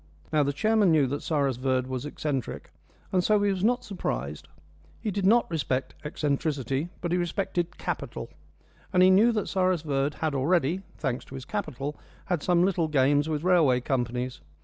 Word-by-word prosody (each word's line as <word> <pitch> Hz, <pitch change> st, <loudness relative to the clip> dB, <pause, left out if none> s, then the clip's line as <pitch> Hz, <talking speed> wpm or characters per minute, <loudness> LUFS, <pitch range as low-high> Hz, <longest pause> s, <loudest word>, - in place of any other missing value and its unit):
Now, 155 Hz, -, +4 dB
the 140 Hz, 0 st, +1 dB
chairman 215 Hz, +5 st, +3 dB
knew 155 Hz, -3 st, +4 dB
that 140 Hz, +3 st, -3 dB
Cyrus 140 Hz, -5 st, 0 dB
Verd 130 Hz, 0 st, 0 dB
was 130 Hz, +2 st, -4 dB
eccentric, 145 Hz, -4 st, -4 dB, 0.4 s
and 180 Hz, -1 st, +2 dB
so 210 Hz, +1 st, +3 dB
he 205 Hz, -, +3 dB
was 190 Hz, -1 st, -2 dB
not 245 Hz, +3 st, +2 dB
surprised. 75 Hz, -, -4 dB, 0.5 s
He 215 Hz, -, -2 dB
did 195 Hz, -1 st, 0 dB
not 235 Hz, +3 st, +5 dB
respect 135 Hz, -5 st, -1 dB
eccentricity. 145 Hz, -1 st, -1 dB
But 175 Hz, -, -2 dB
he 180 Hz, -, +2 dB
respected 175 Hz, 0 st, -2 dB
capital; -, -, -4 dB, 0.6 s
and 180 Hz, -2 st, +5 dB
he 185 Hz, -, +7 dB
knew 215 Hz, +6 st, +6 dB
that 210 Hz, -2 st, -1 dB
Cyrus 185 Hz, -3 st, +1 dB
Verd 140 Hz, -1 st, 0 dB
had 155 Hz, -2 st, -1 dB
already 165 Hz, +5 st, +1 dB, 0.2 s
thanks 130 Hz, -5 st, -2 dB
to 135 Hz, -, -10 dB
his 130 Hz, -1 st, -7 dB
capital 150 Hz, -, -4 dB, 0.3 s
had 175 Hz, -4 st, -1 dB
some 175 Hz, +1 st, +3 dB
little 175 Hz, -4 st, +1 dB
games 145 Hz, +1 st, +2 dB
with 155 Hz, -1 st, -2 dB
railway 165 Hz, -9 st, +4 dB
companies. 125 Hz, -, -2 dB
155 Hz, 175 wpm, -27 LUFS, 135-185 Hz, 0.6 s, he